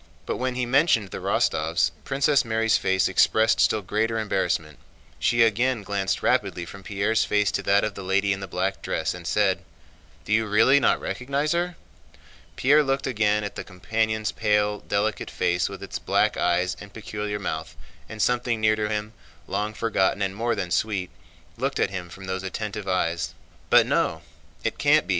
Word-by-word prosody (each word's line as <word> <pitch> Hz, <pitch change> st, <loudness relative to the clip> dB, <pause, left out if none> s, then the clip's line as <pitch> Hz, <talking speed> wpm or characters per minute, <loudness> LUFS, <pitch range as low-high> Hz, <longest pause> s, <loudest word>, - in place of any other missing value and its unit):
But -, -, -2 dB
when 130 Hz, 0 st, -2 dB
he 125 Hz, 0 st, -1 dB
mentioned 120 Hz, -, +2 dB
the -, -, -5 dB
Rostóvs, -, -, +1 dB
Princess 140 Hz, +2 st, +2 dB
Mary's 115 Hz, -1 st, +1 dB
face 95 Hz, 0 st, +2 dB
expressed 110 Hz, +4 st, +3 dB
still 110 Hz, -2 st, +3 dB
greater 110 Hz, +4 st, 0 dB
embarrassment. 85 Hz, -7 st, -1 dB, 0.4 s
She 120 Hz, -1 st, +3 dB
again 115 Hz, +1 st, +1 dB
glanced 100 Hz, -1 st, -2 dB
rapidly 85 Hz, -, +1 dB
from 100 Hz, +3 st, -11 dB
Pierre's 105 Hz, +3 st, 0 dB
face 105 Hz, -1 st, +1 dB
to -, -, -1 dB
that 100 Hz, +1 st, +3 dB
of 110 Hz, -1 st, -1 dB
the 100 Hz, -, -8 dB
lady 100 Hz, +1 st, +1 dB
in 95 Hz, -, -5 dB
the 95 Hz, -, -6 dB
black -, -, -2 dB
dress -, -, -2 dB
and -, -, -8 dB
said: -, -, +2 dB, 0.7 s
"Do 105 Hz, -, -1 dB
you 110 Hz, 0 st, +2 dB
really 130 Hz, +7 st, +5 dB
not -, -, +3 dB
recognize 140 Hz, +4 st, -2 dB
her?" 175 Hz, +1 st, 0 dB, 0.8 s
Pierre 145 Hz, +4 st, +4 dB
looked 135 Hz, -1 st, -1 dB
again 105 Hz, -4 st, +1 dB
at 105 Hz, -, -4 dB
the -, -, -5 dB
companion's 110 Hz, +3 st, -1 dB
pale, 105 Hz, -1 st, +1 dB
delicate 105 Hz, +1 st, -1 dB
face 90 Hz, 0 st, 0 dB
with -, -, -8 dB
its -, -, -5 dB
black -, -, +1 dB
eyes 90 Hz, +1 st, +1 dB
and 105 Hz, -, -11 dB
peculiar 105 Hz, -1 st, -4 dB
mouth, 80 Hz, -6 st, -4 dB, 0.3 s
and 110 Hz, -, -8 dB
something 120 Hz, -2 st, +1 dB
near 110 Hz, 0 st, +3 dB
to 105 Hz, -1 st, -2 dB
him, 105 Hz, 0 st, -3 dB, 0.3 s
long 105 Hz, +2 st, -2 dB
forgotten 100 Hz, -3 st, 0 dB
and 95 Hz, 0 st, -2 dB
more 115 Hz, +2 st, 0 dB
than 90 Hz, -, -4 dB
sweet, 95 Hz, +2 st, -1 dB, 0.5 s
looked -, -, -2 dB
at 95 Hz, -, +1 dB
him 90 Hz, -3 st, -5 dB
from 95 Hz, +2 st, -10 dB
those 95 Hz, 0 st, -3 dB
attentive 105 Hz, +1 st, -5 dB
eyes. 85 Hz, -2 st, -1 dB, 0.3 s
"But -, -, +6 dB
no, 80 Hz, +1 st, 0 dB, 0.4 s
it -, -, -2 dB
can't -, -, +4 dB
be!" -, -, -18 dB
105 Hz, 180 wpm, -25 LUFS, 95-115 Hz, 0.8 s, But